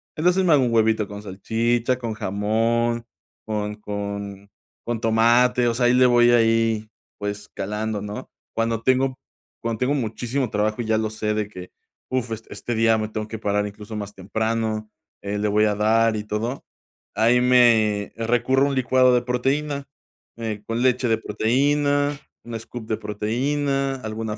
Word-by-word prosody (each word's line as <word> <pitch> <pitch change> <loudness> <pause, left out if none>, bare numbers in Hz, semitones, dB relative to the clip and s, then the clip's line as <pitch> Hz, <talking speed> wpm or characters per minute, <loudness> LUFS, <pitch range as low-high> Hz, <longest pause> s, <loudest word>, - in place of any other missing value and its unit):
Entonces 180 +4 +2
me 165 - +5
hago 135 -3 +5
un 120 - 0
huevito 110 -2 +2
con 105 0 -8
salchicha, 115 +5 0
con 115 -3 -3
jamón, 115 +4 0 0.4
con 105 -1 -3
con 100 -1 -5 0.4
con 115 -1 -2
tomate, 120 +2 +4
o 115 - +2
sea, 120 0 +2
ahí 125 - +4
le 125 0 +6
voy 120 -1 +5
ahí, 115 -2 +2 0.3
pues, 105 0 -5
calando, 105 +1 -3
¿no?, 105 0 -7 0.3
cuando 115 0 0
tengo 130 0 +2 0.4
cuando 115 -1 -3
tengo 130 +3 +1
muchísimo 120 +1 -2
trabajo 105 +3 0
y - - -4
ya 110 0 +2
lo 110 -1 -1
sé 105 0 -2
de 105 -1 -2
que, 90 -3 -10 0.4
uf, 125 -3 -2
es 110 0 -4
este 120 - -4
día 115 0 +4
me 110 0 -3
tengo 110 0 -4
que 110 0 -6
parar 105 -1 0
incluso 105 +1 -9
más 105 0 -6
temprano, 110 +2 -2 0.3
eh, 100 +1 -3
le 105 - 0
voy 105 +1 +3
a 105 - +1
dar 110 +1 +3
y 105 - -3
todo, 115 +5 -3 0.5
ahí 120 +2 +4
me 115 -5 +4
recurro 120 +4 +2
un 140 - -1
licuado 130 0 +4
de 120 - +3
proteína, 140 +3 -1 0.5
eh, 110 -2 -4
con 115 +1 -1
leche 125 0 +2
de 110 - +3
proteína, 145 +6 +1 0.3
un 120 -1 -5
scoop 115 0 -8
de 110 - -1
proteína, 135 +6 -1
alguna 110 0 -4
115 Hz, 170 wpm, -23 LUFS, 105-125 Hz, 0.5 s, le